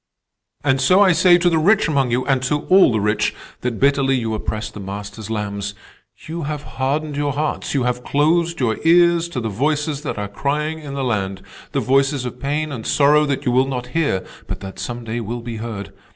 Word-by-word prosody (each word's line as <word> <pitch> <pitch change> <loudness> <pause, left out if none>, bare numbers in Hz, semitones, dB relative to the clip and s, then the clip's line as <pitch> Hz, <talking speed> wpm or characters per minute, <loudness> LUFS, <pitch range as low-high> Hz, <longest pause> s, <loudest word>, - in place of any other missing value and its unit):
"And 135 -2 +2
so 180 +9 +5
I 195 -2 +6
say 175 +1 +5
to 175 0 +1
the 165 -2 +3
rich 200 +7 +4
among 140 -5 +1
you, 125 +2 0
and 135 -2 +1
to 145 +3 0
all 190 -6 +7
the 110 - +1
rich, 105 +1 0 0.2
that 120 -2 -3
bitterly 140 -1 +3
you 115 -3 -1
oppress 110 0 -3
the 105 - -9
Master's 105 +2 -7
lambs. 100 -2 -3 0.5
You 165 +2 -5
have 150 -1 -4
hardened 145 +3 -2
your 145 -1 -1
hearts. 150 0 -2
You 135 - +2
have 125 0 -1
closed 165 +5 +1
your 115 -4 0
ears 170 0 +4
to 145 - -3
the 115 - -3
voices 145 +6 -1
that - - -4
are 105 0 -3
crying 150 +9 -2
in 140 -3 -7
the 135 - -2
land—the 95 -6 -3
voices 135 0 +2
of 125 0 -6
pain 150 +3 -2
and 120 -5 -5
sorrow 150 +1 +4
that 140 -1 -2
you 125 - +2
will 130 +2 +3
not 125 -2 -4
hear 145 - 0 0.2
but - - -5
that 95 0 -8
some 120 0 -5
day 115 +1 -3
will 115 +2 -4
be 115 -1 -6
heard. 110 -4 -6
135 Hz, 210 wpm, -20 LUFS, 115-150 Hz, 0.5 s, all